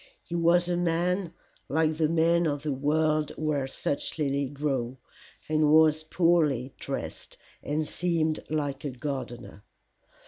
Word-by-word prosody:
He - - -9
was 170 +1 +3
a 175 -1 0
man 175 +1 0 0.4
like 155 +3 +2
the 155 -1 +2
men 165 +1 +3
of 145 -1 -2
the 150 -2 -1
world 155 +2 +1
where 150 -3 -1
such 140 +3 -3
lilies 140 -2 0
grow, 135 -3 -2 0.5
and 155 -1 +2
was 155 0 +5
poorly 155 -6 +2
dressed, - - -6 0.2
and 150 +1 -2
seemed 165 -3 0
like 145 -3 -2
a 145 - -2
gardener. 125 -5 -6
155 Hz, 135 wpm, -28 LUFS, 140-165 Hz, 0.5 s, was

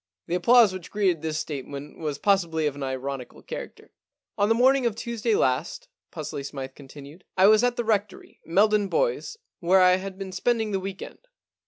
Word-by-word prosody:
* 95 - -68
The - - -5
applause 220 +3 +5
which 185 -2 -8
greeted 190 -6 0
this 155 -1 -2
statement 140 -1 -6
was 150 -3 -3
possibly 170 -4 +1
of 145 - 0
an 145 - -9
ironical 130 -1 -5
character. - - -8 0.2
* - - -66
On 205 +1 +3
the 225 - +4
morning 260 +1 +4
of 220 - -2
Tuesday 230 -1 -1
last,* 130 -7 -1 0.2
Pusely 140 - -6
Smythe 135 -1 -6
continued, 145 +4 -13
* - - -50
I 190 - +6
was 215 +2 +6
at 245 -1 +2
the 240 - -2
Rectory, 210 -3 -2
Meldon 205 +4 +3
Bois, - - -1 0.2
where 185 +2 +4
I 180 0 +6
had 190 0 -7
been 195 -1 -6
spending 220 +3 0
the 195 - 0
week 190 0 -6
end. - - -11
185 Hz, 200 wpm, -25 LUFS, 150-215 Hz, 0.2 s, I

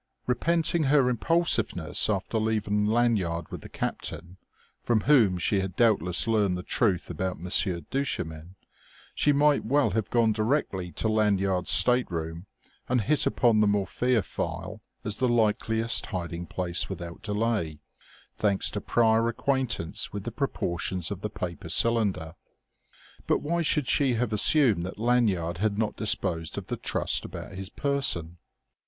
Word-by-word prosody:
Repenting 165 +4 +1
her 135 -2 +4
impulsiveness, 120 - +1
after 105 +2 -1
leaving 105 -1 0
Lanyard 105 -8 +1
with - - -7
the - - -11
captain, 85 +3 -5 0.5
from 115 -3 +1
whom 115 -10 +4
she 95 +3 +1
had 95 -1 -4
doubtless 95 -7 +2
learned 105 -5 +1
the 90 - -6
truth 95 -7 0
about 90 +1 -3
"Monsieur 90 0 0
Duchemin," 80 - -4 0.6
she 145 - +2
might 145 0 +3
well 140 +5 +2
have 110 -3 -2
gone 115 -2 +3
directly 110 -5 -1
to - - -2
Lanyard's 100 -4 +1
stateroom 85 -8 +1 0.4
and 125 -1 +2
hit 145 +7 +1
upon 115 -4 +3
the 105 - +4
morphia 105 +3 +1
phial - - -5 0.2
as 105 -1 -1
the 130 -1 +1
likeliest 110 0 +1
hiding 85 -1 -5
place 90 -1 -2
without 85 -1 -7
delay, 105 -7 -2 0.5
thanks 100 -2 0
to 105 - -4
prior 115 -1 +2
acquaintance 125 -7 -1
with - - -6
the - - -5
proportions 85 +1 -2
of 100 -2 -5
the 105 - -3
paper 90 -5 -6
cylinder. 105 -9 +1 0.9
But - - +1
why 170 +3 0
should 150 -4 +1
she 135 -4 +2
have 115 -1 -1
assumed 110 - +4
that 95 +3 -6
Lanyard 105 -8 +1
had 105 0 0
not 110 -1 -1
disposed 80 -1 0
of - - -5
the - - -3
trust - - 0
about - - -8
his 95 0 -6
person? 95 - -1
105 Hz, 145 wpm, -27 LUFS, 90-120 Hz, 0.9 s, her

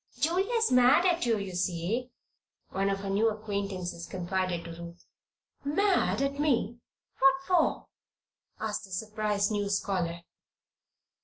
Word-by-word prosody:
"Julia's 395 +9 +1
mad 250 +7 +6
at 345 -7 +2
you, 225 -2 +3
you 195 -2 -5
see," 185 +7 -1 0.6
one 195 +1 0
of 195 0 -1
her 195 - -4
new 215 +3 +3
acquaintances 200 -5 -4
confided 180 -1 -2
to 170 - -7
Ruth. 170 +1 -10 0.6
"Mad 360 0 +2
at 280 +1 -2
me? 240 -6 +1 0.4
What 270 0 +6
for?" 360 -3 +2 0.7
asked 215 -1 -3
the - - -17
surprised 210 +1 -1
new 205 -1 -1
scholar. 180 -4 -1
210 Hz, 130 wpm, -29 LUFS, 185-270 Hz, 0.7 s, mad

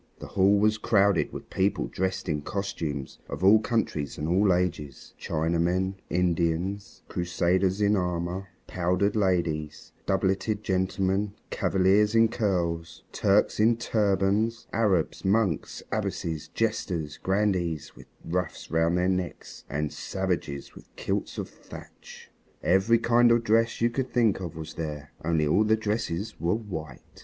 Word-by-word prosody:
The - - -9
hall 100 +1 +4
was 110 +1 +2
crowded 100 -4 +3
with - - -9
people 95 +2 +1
dressed 95 +1 -2
in 75 -3 -1
costumes 75 -7 -4
of - - -5
all 105 +3 +7
countries 105 - -2
and 75 - -3
all 95 +4 +3
ages 85 -7 -2
Chinamen, 85 +4 0 0.2
Indians, 90 +3 -1
Crusaders 90 +2 0
in 105 0 +4
armor, 90 +1 -2 0.2
powdered 90 +4 0
ladies, 85 -7 -1 0.2
doubleted 95 +2 0
gentlemen, 95 +2 0 0.2
Cavaliers 100 +3 +3
in 115 0 +5
curls, 85 -7 -2
Turks 100 +2 +2
in 115 +2 +4
turbans, 105 +1 +1
Arabs, 95 -8 +1
monks, 95 -4 0
abbesses, 80 -2 -3
jesters, 90 -9 -2
grandees 95 -5 -1
with - - -14 0.2
ruffs 90 +2 -3
round 80 +1 +2
their 90 +1 +2
necks, 90 -2 -3
and 75 +1 -2
savages 90 -7 -3
with - - -15
kilts - - -3
of - - -3
thatch. - - -13 0.3
Every 95 +6 +4
kind 120 +1 +4
of 115 0 +3
dress 115 +1 +2
you 120 0 +3
can 130 +2 -1
think 115 -6 +2
of 85 -4 -6
was 80 -1 -7
there. 75 -3 -6
Only 80 -1 +1
all 90 +8 +3
the 110 +1 +3
dresses 105 -3 -3
were 85 +5 +1
white. 80 - -6
95 Hz, 135 wpm, -27 LUFS, 85-105 Hz, 0.3 s, all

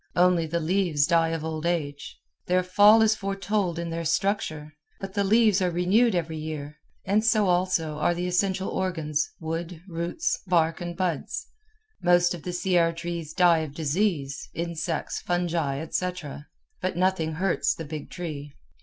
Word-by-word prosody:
Only 180 -2 +3
the 170 +2 -1
leaves 170 -3 +1
die 165 +1 +3
of 165 -1 -3
old 160 -1 -4
age. 150 -4 -3 0.3
Their 180 0 +2
fall 205 +4 +6
is 220 0 +4
foretold 195 -3 -1
in 170 0 -3
their 165 0 -3
structure; 160 -3 -1 0.3
but 195 -1 -6
the 200 -1 +1
leaves 215 -1 +4
are 180 - +2
renewed 185 +6 +3
every 165 -2 -2
year, 150 -1 -6 0.3
and 205 +3 +2
so 220 -2 +3
also 175 -4 +1
are 175 - +2
the 175 +1 -2
essential 190 +1 0
organs 160 -5 -1
wood, 165 +1 -4
roots, 175 - -2
bark, 165 -2 +2 0.2
buds. 185 - -2 0.6
Most 175 0 +4
of 175 - -7
the 180 - -4
Sierra 175 -2 +2
trees 170 -2 -5
die 170 -1 +4
of 155 -3 -5
disease, 155 -3 -1
insects, 165 -1 -3
fungi, 170 -5 -1
etc., 160 -3 -4 0.3
but 185 -1 -2
nothing 180 -3 +1
hurts 180 +3 +1
the 165 - -6
big 150 -1 -7
tree. 150 -5 -6
175 Hz, 155 wpm, -26 LUFS, 160-185 Hz, 0.6 s, fall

